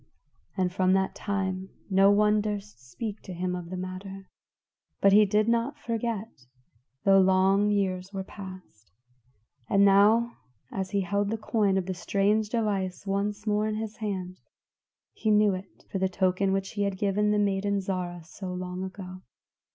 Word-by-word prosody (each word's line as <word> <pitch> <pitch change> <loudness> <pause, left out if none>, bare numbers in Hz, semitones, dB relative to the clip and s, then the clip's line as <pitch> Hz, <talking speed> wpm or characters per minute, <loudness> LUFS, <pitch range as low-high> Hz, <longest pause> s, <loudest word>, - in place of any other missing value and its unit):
And 180 -1 0
from 185 0 +3
that 190 0 +1
time 190 -2 -3 0.2
no 195 0 +5
one 210 +1 +4
durst 205 - -6
speak 210 - -5
to 185 - -8
him 180 +1 -2
of 175 -2 -6
the 185 - -5
matter. 185 +1 -7 0.7
But 195 0 +5
he 210 0 +7
did 210 +2 +2
not 235 +5 +1
forget, 225 - -4 0.6
though 195 -1 +6
long 190 +2 +4
years 190 -2 -1
were 195 -1 -4
passed. 185 - -11 0.8
And 200 0 +5
now 215 +4 +4 0.3
as 190 -1 -3
he 200 0 0
held 200 +2 0
the 225 - -1
coin 210 -3 +1
of 190 -1 -1
strange 205 +4 +1
device 200 -5 -1
once 205 +1 -2
more 210 0 +1
in 215 - -2
his 220 0 -5
hand, 185 -4 -4 0.7
he 220 - -2
knew 210 -1 +4
it 185 +1 -9
for 195 - -2
the 190 0 +1
token 185 +1 +1
which 195 0 -1
he 205 - -3
had 200 -1 0
given 205 +1 +1
the 210 - +2
maiden, 200 0 +1
Zarah, 180 -3 -4
so 180 +3 -7
long 180 0 -4
ago. 185 -1 -8
195 Hz, 165 wpm, -27 LUFS, 185-210 Hz, 0.8 s, he